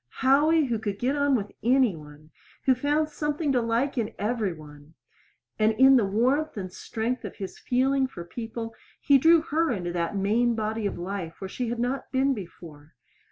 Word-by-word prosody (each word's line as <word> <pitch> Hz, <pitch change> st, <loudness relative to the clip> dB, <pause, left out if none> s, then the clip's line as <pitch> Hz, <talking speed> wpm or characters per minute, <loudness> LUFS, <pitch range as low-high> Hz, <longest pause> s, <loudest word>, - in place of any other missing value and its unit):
Howie, 300 Hz, +4 st, +4 dB
who 235 Hz, -4 st, -1 dB
could 205 Hz, -2 st, -3 dB
get 255 Hz, +6 st, 0 dB
on 285 Hz, -1 st, +2 dB
with 205 Hz, -4 st, -3 dB
any 250 Hz, -4 st, +3 dB
one, 150 Hz, 0 st, -14 dB, 0.3 s
who 265 Hz, -, +5 dB
found 295 Hz, +4 st, 0 dB
something 295 Hz, 0 st, -2 dB
to 250 Hz, -2 st, +2 dB
like 240 Hz, +4 st, 0 dB
in 220 Hz, -, -3 dB
every 215 Hz, -2 st, -1 dB
one; 150 Hz, -1 st, -13 dB, 0.6 s
and 215 Hz, +1 st, +3 dB
in 265 Hz, +4 st, +6 dB
the 235 Hz, -5 st, +4 dB
warmth 255 Hz, +8 st, +1 dB
and 185 Hz, -2 st, -5 dB
strength 230 Hz, +6 st, -3 dB
of -, -, -7 dB
his 195 Hz, -2 st, -7 dB
feeling 265 Hz, +2 st, +1 dB
for 175 Hz, -9 st, -9 dB
people 225 Hz, +3 st, -6 dB, 0.3 s
he 280 Hz, -1 st, +4 dB
drew 325 Hz, +3 st, +6 dB
her 325 Hz, +1 st, 0 dB
into 180 Hz, -6 st, -3 dB
that 170 Hz, +2 st, -2 dB
main 230 Hz, +5 st, +2 dB
body 220 Hz, -1 st, -2 dB
of -, -, -5 dB
life 175 Hz, -2 st, -5 dB
where 190 Hz, -, -5 dB
she 240 Hz, +5 st, -4 dB
had 240 Hz, -, -3 dB
not 250 Hz, +3 st, -2 dB
been 270 Hz, +1 st, +2 dB
before. 165 Hz, -, -11 dB
230 Hz, 190 wpm, -26 LUFS, 195-270 Hz, 0.6 s, in